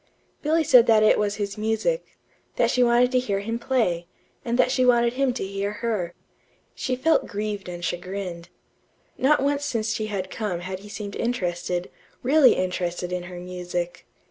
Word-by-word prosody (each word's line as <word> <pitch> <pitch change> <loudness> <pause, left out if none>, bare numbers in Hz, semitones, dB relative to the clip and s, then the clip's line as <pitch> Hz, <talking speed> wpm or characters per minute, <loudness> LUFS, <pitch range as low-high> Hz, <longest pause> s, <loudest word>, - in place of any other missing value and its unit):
Billy 320 +2 +2
said 250 -5 +6
that 220 -1 +5
it 215 - +5
was 205 -1 0
his 205 0 -4
music; 225 - -1 0.4
that - - +2
she 250 - +2
wanted 245 +1 +4
to 255 - +3
hear 200 -6 -1
him 225 +3 -3
play, 220 -10 0 0.4
and 235 0 -1
that 255 - +3
she 255 -1 +2
wanted 240 -1 +4
him 270 0 +1
to 240 - -3
hear 200 +1 -3
her. 210 -6 -2 0.6
She 255 - -2
felt 320 +6 +2
grieved 205 -2 -4
and 175 0 -5
chagrined. 175 0 -4 0.7
Not 275 +1 +3
once 285 0 +1
since 225 -6 -1
she 215 - -2
had 190 -3 -4
come 200 -6 -3
had 185 +1 -5
he 205 +2 -12
seemed 205 -1 -6
interested 180 -6 -2 0.3
really 280 +2 +6
interested 180 -1 -2
in 180 0 -2
her 180 -1 -8
music. 180 -1 -5
210 Hz, 175 wpm, -24 LUFS, 180-250 Hz, 0.7 s, said